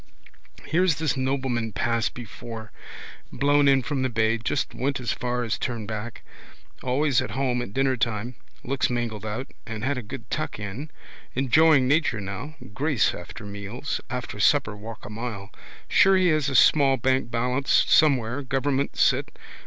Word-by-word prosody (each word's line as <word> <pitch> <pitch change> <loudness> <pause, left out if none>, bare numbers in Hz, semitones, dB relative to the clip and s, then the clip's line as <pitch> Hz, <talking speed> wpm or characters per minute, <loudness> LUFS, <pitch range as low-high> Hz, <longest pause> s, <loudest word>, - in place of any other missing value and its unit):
Here's 175 0 +2
this 160 -2 0
nobleman 130 -4 -1
passed 115 0 0
before. 115 -1 -8 0.6
Blown 145 +2 +3
in 135 -1 +4
from 135 +2 -2
the 130 - +1
bay. 115 0 +1
Just 120 +4 -2
went 135 +2 -1
as 120 -3 -2
far 125 0 -2
as 115 - -2
turn 115 -4 -3
back. 110 +2 -6 0.6
Always 130 +1 +2
at - - -4
home 125 -2 0
at 120 - -6
dinnertime. 120 -3 0 0.3
Looks 135 +1 0
mangled 115 -3 -3
out: 115 +6 -5
had 115 +5 -2
a - - -5
good 115 +1 -9
tuck 155 - -2
in. 105 +9 -6 0.5
Enjoying 135 +1 +4
nature 145 -5 +2
now. 105 +10 -6 0.2
Grace 135 - +1
after 90 +4 -9
meals. 100 +7 -5
After 120 -3 -5
supper 105 -1 +3
walk 110 +1 -9
a - - -7
mile. 105 -3 -6 0.4
Sure 195 0 +5
he 185 -1 +3
has 155 -2 +2
a 135 - -3
small 135 0 +5
bank 130 0 +1
balance 125 +3 -1 0.2
somewhere, 135 -4 +3
government 135 +1 -1
sit. - - +2
125 Hz, 155 wpm, -25 LUFS, 110-140 Hz, 0.6 s, Sure